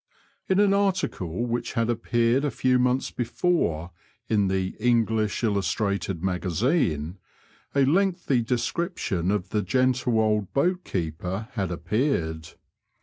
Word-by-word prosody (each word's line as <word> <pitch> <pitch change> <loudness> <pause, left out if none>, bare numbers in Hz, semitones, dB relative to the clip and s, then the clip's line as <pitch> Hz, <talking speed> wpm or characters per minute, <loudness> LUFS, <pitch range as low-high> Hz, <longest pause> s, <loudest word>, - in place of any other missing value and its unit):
In 190 +1 +3
an 205 -1 +4
article 185 - 0
which 120 0 -2
had 115 -1 +1
appeared 120 +2 +1
a 145 - +1
few 130 -1 +2
months 125 +1 +1
before 115 - -1 0.4
in 105 -3 +2
the 95 0 -1
English 110 -2 +1
Illustrated 100 -3 -1
Magazine 90 - 0 0.6
a 140 -1 +4
lengthy 175 -4 +2
description 120 - -1
of 100 -2 -1
the 105 - 0
gentle 125 -1 +1
old 105 -3 +1
boatkeeper 95 - -1
had 95 -6 -2
ap 85 -1 -6
peared. 85 - -1
115 Hz, 120 wpm, -25 LUFS, 95-130 Hz, 0.6 s, an